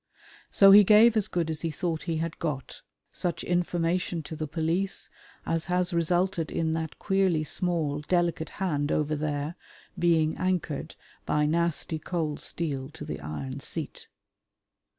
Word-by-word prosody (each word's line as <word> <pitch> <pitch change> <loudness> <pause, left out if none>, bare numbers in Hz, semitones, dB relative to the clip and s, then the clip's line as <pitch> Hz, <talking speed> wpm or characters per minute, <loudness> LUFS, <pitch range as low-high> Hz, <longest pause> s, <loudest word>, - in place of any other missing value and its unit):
So 195 -1 +7
he 205 +1 +10
gave 215 +3 +6
as 215 -3 +2
good 165 -2 -1
as 155 - -4
he 165 - -1
thought 160 0 -2
he 165 - 0
had 165 0 -3
got 145 -6 -4 0.3
such 175 - -2
information 175 -1 0
to 155 +2 -7
the 155 0 -4
police 165 +5 -2 0.3
as 165 0 -1
has 180 0 0
resulted 170 0 +1
in 160 -1 -1
that 160 -1 -3
queerly 190 -5 +1
small 160 -4 -1
delicate 175 -3 +1
hand 150 -6 0
over 155 0 +1
there 150 +1 -2 0.4
being 160 -2 +3
anchored 180 -6 -2 0.3
by 150 0 +1
nasty 165 0 0
cold 155 -2 -2
steel 140 -6 -3
to - - -9
the - - -5
iron 130 - -5
seat. 155 +1 -5
165 Hz, 150 wpm, -27 LUFS, 155-180 Hz, 0.4 s, he